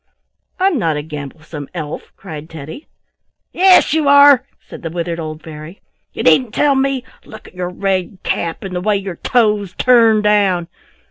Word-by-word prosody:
"I'm 370 Hz, -6 st, +2 dB
not 160 Hz, -5 st, 0 dB
a 150 Hz, -, -4 dB
gamblesome 150 Hz, 0 st, -8 dB
elf!" 155 Hz, -3 st, -6 dB
cried 155 Hz, -4 st, -9 dB
Teddy. 160 Hz, -, -10 dB, 0.7 s
"Yes 370 Hz, -2 st, +5 dB
you 315 Hz, -2 st, +1 dB
are!" 280 Hz, -2 st, +6 dB
said -, -, -12 dB
the 165 Hz, -, -5 dB
withered 170 Hz, 0 st, -4 dB
old 155 Hz, -1 st, -7 dB
fairy. 155 Hz, +3 st, -10 dB, 0.3 s
"You -, -, -5 dB
needn't 210 Hz, +8 st, +3 dB
tell 290 Hz, -1 st, +3 dB
me! 270 Hz, -1 st, 0 dB, 0.2 s
Look 220 Hz, -, -13 dB
at -, -, -26 dB
your 180 Hz, -1 st, -4 dB
red 190 Hz, 0 st, -2 dB
cap 165 Hz, -1 st, -3 dB
and 190 Hz, -2 st, -6 dB
the 180 Hz, -, -2 dB
way 210 Hz, +2 st, +1 dB
your 195 Hz, -3 st, -6 dB
toes 210 Hz, -6 st, 0 dB
turn 230 Hz, -4 st, +4 dB
down. 195 Hz, -5 st, +2 dB
190 Hz, 170 wpm, -17 LUFS, 165-245 Hz, 0.7 s, are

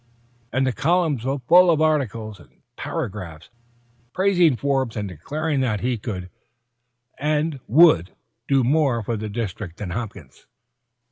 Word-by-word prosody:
"_ -, -, -39 dB, 0.5 s
And 130 Hz, +1 st, +1 dB
the 130 Hz, -, 0 dB
columns 155 Hz, -4 st, +1 dB
were 135 Hz, +1 st, 0 dB
full 180 Hz, +1 st, +7 dB
of 160 Hz, -3 st, +3 dB
articles 115 Hz, -9 st, 0 dB
and 70 Hz, -, -17 dB, 0.3 s
paragraphs 90 Hz, -2 st, -6 dB, 0.6 s
praising 180 Hz, -6 st, +3 dB
Forbes 135 Hz, -3 st, -1 dB
and 105 Hz, -1 st, -2 dB
declaring 145 Hz, -, -3 dB
that 115 Hz, -6 st, 0 dB
he 125 Hz, -1 st, -1 dB
could 90 Hz, -5 st, -6 dB, 0.9 s
and 150 Hz, 0 st, 0 dB
would 125 Hz, -, +5 dB, 0.4 s
do 135 Hz, -2 st, +3 dB
more 135 Hz, -3 st, +2 dB
for 115 Hz, +3 st, -2 dB
the 110 Hz, 0 st, -5 dB
district 100 Hz, -5 st, -5 dB
than 95 Hz, -4 st, -5 dB
Hopkins. 100 Hz, -, -7 dB
125 Hz, 140 wpm, -22 LUFS, 105-150 Hz, 0.9 s, full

